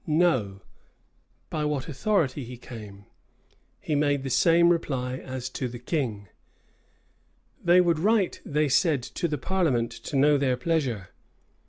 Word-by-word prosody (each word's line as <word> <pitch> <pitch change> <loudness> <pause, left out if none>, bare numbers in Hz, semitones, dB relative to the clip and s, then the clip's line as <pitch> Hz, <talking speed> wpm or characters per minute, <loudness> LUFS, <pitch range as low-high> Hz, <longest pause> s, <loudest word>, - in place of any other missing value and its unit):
"No;" 140 - +1 0.9
by 155 - -2
what 150 -3 -2
authority 150 -3 0
he 125 +1 -9
came? 105 -5 -11 0.7
he 155 - -3
made 145 -1 +1
the 135 - -4
same 170 +5 +5
reply 130 -7 -1
as 130 -1 -6
to 130 - -3
the 120 0 -7
king. 120 - -3 1.4
"They 175 +1 +6
would 170 -3 +2
write," 205 +1 +1
they 150 +1 0
said, 145 -1 +2
"to 170 - -3
the 150 -2 -2
parliament 145 -8 0
to - - -7
know 145 +1 +4
their 130 -2 +1
pleasure." 125 - -1
140 Hz, 140 wpm, -26 LUFS, 125-165 Hz, 1.4 s, They